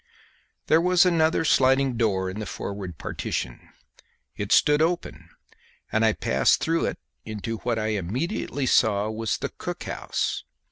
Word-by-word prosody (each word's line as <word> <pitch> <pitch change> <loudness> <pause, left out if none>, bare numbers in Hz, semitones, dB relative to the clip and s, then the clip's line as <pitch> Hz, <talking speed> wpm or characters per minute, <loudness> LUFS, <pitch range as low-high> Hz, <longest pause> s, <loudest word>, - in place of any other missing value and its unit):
There 160 +1 +4
was 180 0 +4
another 165 -2 +2
sliding 135 -2 +3
door 100 -5 +1
in 95 +3 -5
the 105 - -5
forward 95 -5 -6
partition; 65 -3 -4 0.7
it 100 +1 -5
stood 150 0 +5
open, 170 +2 -2 0.6
and 110 - +2
I 110 -1 +4
passed 65 -8 +2
through 165 +1 0
it - - -3 0.3
into 110 +1 -5
what 115 +1 -2
I 110 0 -1
immediately 125 - -2
saw 110 -3 +2
was 110 0 -2
the - - -3
cook - - -6
house. - - -3
115 Hz, 145 wpm, -25 LUFS, 105-155 Hz, 0.7 s, stood